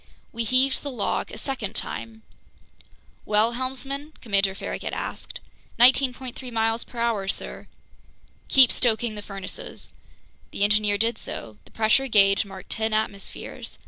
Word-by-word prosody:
We 230 0 -2
heaved 260 +3 +3
the 285 - -4
log 230 -7 -1
a - - -8
second 225 -4 -4
time. 220 -1 -3 1.0
"Well, 215 +2 +3
helmsman?" 270 +4 -4
Commander 200 -4 +2
Farragut - - -5
asked. - - -4 0.4
"19.3 255 0 +3
miles 225 0 +1
per 245 - -14
hour, 230 -4 0
sir." - - -4 0.8
"Keep 260 -2 +7
stoking 235 -1 +1
the 210 - -6
furnaces." 195 -2 -7 0.6
The - - -1
engineer 210 0 +3
did 230 +3 +1
so. 110 -2 -8
The - - -19
pressure 225 +5 +3
gauge 200 -3 +5
marked 190 -1 -10
ten 220 0 0
atmospheres. 215 -2 -4
225 Hz, 135 wpm, -25 LUFS, 205-255 Hz, 1.0 s, Keep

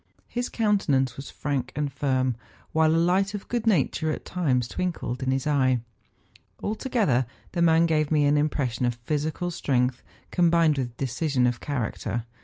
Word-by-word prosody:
His 245 0 -3
countenance 150 - +1
was 135 - -8
frank 135 -3 -3
and 145 -2 -2
firm, 130 -3 0 0.4
while 160 0 +3
a - - +3
light 190 +4 +2
of 205 - -7
good 235 -2 -2
nature 160 - +2
at - - -5
times 130 -10 0
twinkled 150 -6 -3
in 130 - -1
his 135 0 0
eye. 130 -4 +2 0.8
Alto¬ 220 +5 -3
gether 135 - +2 0.2
the 175 - -1
man 165 0 +5
gave 155 -2 +1
me 150 -2 +3
the 145 - +4
impression 130 -5 0
of 120 - -1
physical 150 +8 -2
strength, 125 -5 0 0.3
combined 170 -4 +3
with 120 -2 -4
decision 135 0 0
of 120 -1 0
character. 120 -4 -3
145 Hz, 165 wpm, -26 LUFS, 130-170 Hz, 0.8 s, man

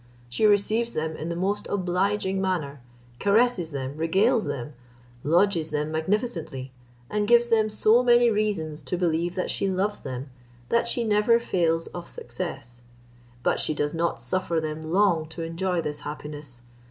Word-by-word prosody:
She 125 - +2
receives 215 +3 +2
them 160 0 -2
in 160 +2 -5
the 170 - -2
most 195 +4 -1
obliging 190 +1 0
manner; 155 -8 -2 0.4
caresses 205 -4 +2
them, 135 -2 -4
regales 200 +9 +2
them, 135 +3 -4 0.5
lodges 170 +1 +2
them 150 +1 -2
magnificently, 160 - -2 0.4
and 210 +5 -1
gives 240 +1 +5
them 220 -2 +3
so 215 +3 +4
many 240 -1 +5
reasons 195 -8 -1
to 180 - -3
believe 170 0 0
that 185 - -1
she 195 - 0
loves 195 +2 -1
them, 130 +1 -6 0.4
that 235 0 +2
she 235 0 +2
never 215 +2 +3
fails 165 -7 0
of 175 -1 -8
success. 120 0 -6 0.6
But - - +2
she 155 - +1
does 145 0 -1
not 170 +1 -1
suffer 185 -3 0
them 155 0 -5
long 175 -5 +3
to 165 +1 -6
enjoy 170 +1 -1
this 150 0 -4
happiness. 145 -4 -7
175 Hz, 155 wpm, -26 LUFS, 155-210 Hz, 0.6 s, gives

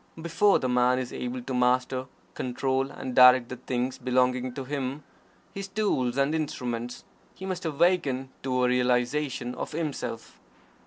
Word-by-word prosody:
Before 170 +5 +3
the 130 - -2
Man 125 0 +3
is 130 -1 -4
able 125 0 -4
to 130 - -5
master, 125 +1 +1 0.3
control, 130 +1 -1
and 130 - -6
direct 125 -1 +7
the 130 - -6
things 125 +1 -3
belonging 125 0 +1
to 135 - -4
him 140 +1 -4 0.5
his 195 0 -5
tools 190 - 0
and 140 +2 +2
instruments 125 -6 -3 0.3
he 190 - -8
must 185 -2 -4
awaken 150 -5 +1
to 125 -1 0
a - - +4
realization 125 +1 0
of - - -6
Himself. 150 -7 -4
130 Hz, 150 wpm, -27 LUFS, 125-145 Hz, 0.5 s, direct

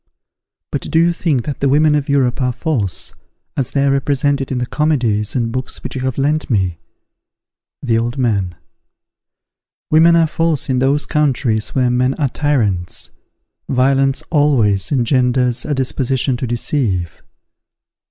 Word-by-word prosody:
_ - - -63 0.7
But - - -2
do - - 0
you 170 +1 +4
think 155 -8 0
that 145 - -4
the 140 - +1
women 150 +2 +4
of 145 -1 -1
Europe 135 -2 +1
are 125 -1 +1
false, 125 - -3 0.4
as 135 - 0
they 140 -1 0
are 140 - +3
represented 140 0 0
in 130 - -1
the 125 - -1
comedies 120 -8 0
and 115 -2 0
books 130 +1 -5
which - - -5
you 130 - -4
have 130 -1 -2
lent 150 +3 0
me? 95 -7 0 1.0
The 115 -4 +2
Old 120 +3 -3
Man. 100 -9 0 1.4
Women 165 +2 +6
are 165 -1 +4
false 160 -3 -1
in 130 - +1
those 140 +3 +1
countries 130 -7 0
where 125 -2 +2
men 125 +2 +1
are 145 -4 0
tyrants. 110 - -1 0.6
Violence 135 +1 +2
always 130 - +2
engenders 125 -1 +1
a 150 - -1
disposition 130 0 0
to 125 - -3
deceive. 105 - -1
130 Hz, 150 wpm, -17 LUFS, 120-145 Hz, 1.4 s, Women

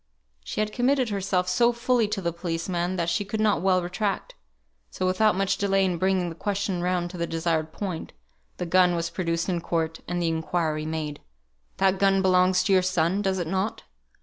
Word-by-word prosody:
She 135 - -3
had 215 0 -2
committed 255 0 +2
herself 190 -2 0
so 235 +7 +3
fully 235 -1 +1
to 210 -1 -3
the 170 -1 -1
policeman, 170 +1 -2
that 170 -2 -1
she 170 +4 0
could 205 +2 -4
not 215 -5 +2
well 185 -1 +2
retract; 195 - -2 0.6
so 185 - -3
without 185 +2 +3
much 195 0 +1
delay 195 -1 +2
in 180 -3 -1
bringing 185 -1 +1
the - - -6
question 195 0 -2
round 175 -1 -1
to 180 - -8
the 170 - -1
desired 165 -1 -1
point, 185 -4 -5 0.5
the 180 - -3
gun 180 0 +4
was 170 0 -2
produced 170 -2 -1
in 175 -3 -1
court, 165 -1 -2
and 175 0 -2
the 170 - 0
inquiry 160 -1 -1
made 155 -2 -4 0.6
"That 190 0 +2
gun 195 -1 +3
belongs 185 0 +4
to 200 - +2
your 185 - +5
son, 185 +1 +1
does 190 -2 0
it 175 - -2
not?" 190 +5 -2
185 Hz, 200 wpm, -26 LUFS, 170-195 Hz, 0.6 s, your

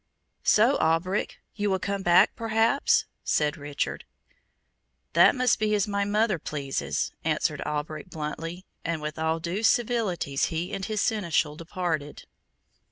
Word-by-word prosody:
"So, 235 +6 +4
Alberic, 165 +5 0 0.2
you 205 -1 -1
will 190 - +2
come 200 +2 -3
back, 175 -1 +5
perhaps?" 225 +4 +2 0.2
said 150 -1 +1
Richard. 145 -1 -3 1.1
"That - - +6
must 250 -2 +2
be 215 0 +2
as 205 -1 +1
my 200 -1 0
mother 210 -2 +1
pleases," 140 -3 -2
answered - - 0
Alberic 150 +2 -4
bluntly, 165 +3 -5 0.2
and 165 -1 -2
with 150 +1 -5
all 160 +1 0
due 175 +5 -3
civilities 220 - +1
he 165 +2 -3
and 195 - -3
his 215 0 -1
Seneschal 170 -9 0
departed. 165 -3 -4
180 Hz, 135 wpm, -26 LUFS, 155-210 Hz, 1.1 s, That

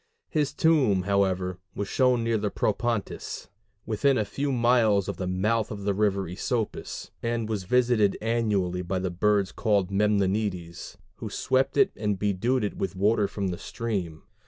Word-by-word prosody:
His 150 -3 0
tomb, 145 - +3
however, 95 -2 0 0.2
was 100 - -3
shown 125 -1 +2
near 115 -1 +1
the 105 0 -1
Propontis, 115 +1 -2 0.4
within 130 +5 +2
a 110 - +1
few 140 +7 -2
miles 115 -5 +3
of - - -4
the 90 - -3
mouth 105 +5 0
of 105 -2 -6
the 100 0 +1
river 100 -1 +1
Æsopus, 105 +6 -4
and 115 -1 -1
was 105 -4 -3
visited 120 -2 +3
annually 105 -6 0
by 90 +1 -2
the 95 -1 -2
birds 100 +2 +1
called 100 -4 +1
Memnonides, 100 -3 -1 0.2
who - - -6
swept 130 +1 0
it 200 -1 +5
and 105 -2 -1
bedewed 105 +6 0
it 105 - -3
with 95 - -3
water 105 +2 +2
from 100 -2 -3
the 90 - -4
stream. 95 -9 -4
105 Hz, 160 wpm, -26 LUFS, 95-115 Hz, 0.4 s, it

